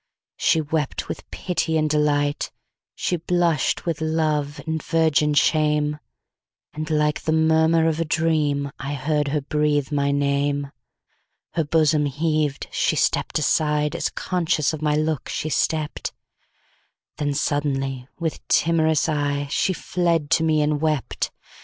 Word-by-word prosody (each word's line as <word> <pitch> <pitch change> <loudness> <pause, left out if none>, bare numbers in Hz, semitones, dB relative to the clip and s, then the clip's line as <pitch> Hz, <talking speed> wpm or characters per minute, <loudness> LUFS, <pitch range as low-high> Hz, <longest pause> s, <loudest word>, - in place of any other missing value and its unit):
She 160 - +3
wept 150 -1 -2
with - - -7
pity 165 -3 -1
and 155 0 +2
delight, 145 -1 +1 0.4
She 180 - -1
blush'd 170 -1 +1
with 165 -2 -3
love 155 -2 0
and 160 -1 -2
virgin 155 -2 +2
shame; 150 0 +2 0.7
And 155 +1 -5
like 150 -1 +1
the 155 - -1
murmur 160 +1 +3
of 160 0 0
a 165 - 0
dream,I 145 -3 0
heard 150 +1 0
her 145 +1 0
breathe 150 0 0
my 140 -1 +1
name. 140 0 0 0.8
Her 165 - +1
bosom 150 -1 +2
heaved—she 150 0 0
stepp'd - - +1
aside, 150 0 +1
As 170 - -1
conscious 165 -4 0
of 155 - -5
my 150 -1 +1
look 155 -1 -1
she 155 - -3
stept—Then 150 - -5
suddenly, 135 -3 -1
with 165 -2 -2
timorous 160 -2 +3
eyeShe 145 +3 0
fled 170 -5 0
to 160 - +4
me 155 -2 +3
and 150 0 0
wept. 155 -4 -1
150 Hz, 130 wpm, -23 LUFS, 145-160 Hz, 0.8 s, to